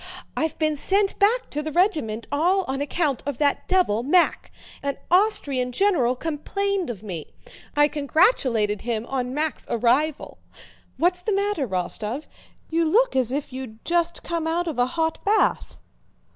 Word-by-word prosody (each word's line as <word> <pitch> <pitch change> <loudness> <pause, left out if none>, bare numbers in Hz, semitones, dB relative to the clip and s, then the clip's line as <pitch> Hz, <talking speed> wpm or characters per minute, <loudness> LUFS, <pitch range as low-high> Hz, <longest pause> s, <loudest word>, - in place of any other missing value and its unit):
"I've 320 -1 -1
been 310 -1 +1
sent 390 +7 0
back 455 +5 +2
to 300 - -2
the 310 +1 -4
regiment 305 - +1
all 355 +7 +2
on 270 +1 -2
account 290 -2 0
of 285 -4 -2
that 285 0 +1
devil, 360 - +2
Mack. 335 +8 +2 0.3
An 280 0 -2
Austrian 285 -10 +2
general 270 -7 +2
complained 360 +6 -2
of 215 -4 -6
me. 175 -7 -7 0.4
I 295 0 +5
congratulated 275 - +2
him 230 -1 -2
on 255 0 -3
Mack's 310 0 -2
arrival... 255 +6 0 0.6
What's 360 +1 +1
the 420 +3 -1
matter, 400 -8 0
Rostóv? 210 - -3 0.5
You 335 +1 +2
look 480 - +3
as 255 -2 +2
if 275 -1 -3
you'd 250 -4 -8
just 340 0 +1
come 335 -1 -2
out 345 +2 0
of 305 -6 -3
a 245 - +3
hot 320 -1 0
bath." 425 +2 +1
300 Hz, 155 wpm, -24 LUFS, 250-355 Hz, 0.6 s, I